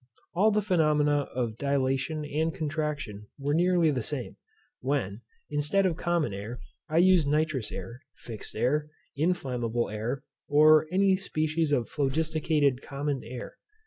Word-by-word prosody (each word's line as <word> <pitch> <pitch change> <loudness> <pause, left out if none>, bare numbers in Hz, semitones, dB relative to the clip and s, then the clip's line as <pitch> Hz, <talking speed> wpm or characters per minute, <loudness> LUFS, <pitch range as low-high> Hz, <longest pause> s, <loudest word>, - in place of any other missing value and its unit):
All 195 +6 +4
the 210 -1 +1
phenomena 150 -6 +2
of 115 -3 -2
dilatation 140 +2 0
and 155 +3 0
contraction 145 -10 -3
were 145 +1 -1
nearly 175 -1 +3
the 130 -3 -1
same, 130 +1 -4 0.4
when, 125 -6 -2 0.3
instead 150 +7 +2
of 180 -3 +1
common 170 - 0
air, 105 +5 -6 0.3
I 155 - 0
used 180 -3 +5
nitrous 150 -5 0
air, 115 +7 -7
fixed 110 -3 -8
air, 150 +7 +1 0.3
inflammable 125 - -1
air, 110 +5 -3 0.2
or 155 +1 +6
any 190 +1 +4
species 155 -4 -1
of 125 -5 +1
phlogisticated 150 -1 +1
common 140 -1 -3
air. 125 - -8
145 Hz, 135 wpm, -28 LUFS, 130-160 Hz, 0.4 s, or